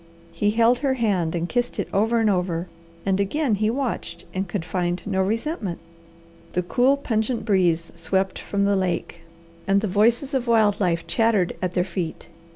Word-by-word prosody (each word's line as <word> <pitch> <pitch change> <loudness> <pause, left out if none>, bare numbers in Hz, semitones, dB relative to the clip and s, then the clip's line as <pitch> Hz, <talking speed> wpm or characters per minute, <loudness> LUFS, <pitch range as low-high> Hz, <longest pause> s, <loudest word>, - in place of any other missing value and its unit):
He 185 +5 0
held 230 +3 +3
her 270 -2 +1
hand 190 -9 0
and 170 0 -1
kissed 245 +4 -1
it - - -2
over 225 +4 +2
and 225 - +2
over, 180 -3 0 0.4
and 195 0 +1
again 245 +6 +1
he 215 +1 +1
watched 235 -9 -3
and 190 +1 -2
could 175 -3 -3
find 175 -1 -1
no 190 -2 0
resentment. 220 - -2 0.8
The 180 - 0
cool, 255 +9 +3
pungent 225 -3 -1
breeze 175 -6 +2
swept 190 +3 -1
from 200 0 -1
the 200 0 +3
lake, 180 -2 -2 0.5
and 195 +1 +4
the 215 - -1
voices 230 +8 +2
of 260 -2 0
wild 215 -3 +3
life 170 -4 0
chattered 220 -6 +2
at 185 -1 -2
their 180 - +3
feet. 175 -3 -5
200 Hz, 175 wpm, -23 LUFS, 180-230 Hz, 0.8 s, and